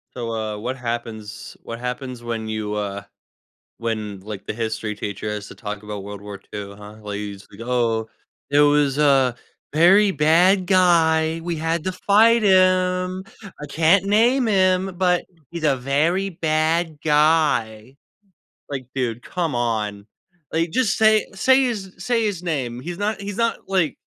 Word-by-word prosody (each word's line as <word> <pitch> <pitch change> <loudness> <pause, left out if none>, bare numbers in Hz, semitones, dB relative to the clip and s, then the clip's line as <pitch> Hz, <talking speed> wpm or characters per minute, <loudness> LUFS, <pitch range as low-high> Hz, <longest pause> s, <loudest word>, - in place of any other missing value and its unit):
So, 115 -2 -4
uh, 110 -1 -3
what 125 +5 -4
happens 115 -3 -6
what 115 0 -7
happens 125 0 -5
when 115 -2 -4
you, 110 -1 -3
uh, 100 -1 -4 0.8
when, 110 -4 -4
like, 105 0 -8
the - - -2
history 110 -1 -3
teacher 105 +1 -5
has 105 -1 -5
to - - -11
talk 105 -1 -6
about 105 -2 -6
World 100 -1 -8
War 100 -1 -8 0.2
II, 100 -1 -6
huh, 105 +1 -12
like, 105 -1 -5
you 105 -1 -5
just 100 - -15
"Oh, 115 -2 0 0.4
it 145 +1 +4
was 145 -1 +3
a 135 -4 +4 0.4
very 195 +7 +5
bad 180 +5 +4
guy, 165 -3 +3
we 170 -1 -3
had 165 +1 -1
to 185 - -1
fight 220 +5 +4
him, 185 -1 +2 0.4
I 150 - -6
can't 165 +6 +3
name 235 +5 +3
him, 185 -2 +2
but 180 -1 +2 0.3
he's 170 -2 -6
a 140 -3 +3
very 160 +9 0
bad 160 0 0
guy," 150 -6 +2 0.7
like, 130 -3 -5
dude, 120 -3 -2
come 170 -7 -3
on, 105 -4 -2 0.5
like, 165 +1 0
just 255 -2 +1
say 220 -1 +4
say 260 +6 +4
his 205 -7 -3
say 230 +3 0
his 195 -5 -2
name, 130 -8 -3
he's 175 +5 -6
not 205 0 -2
he's 200 0 -6
not 230 -1 0
like, 185 -7 +1
150 Hz, 160 wpm, -22 LUFS, 110-185 Hz, 0.8 s, very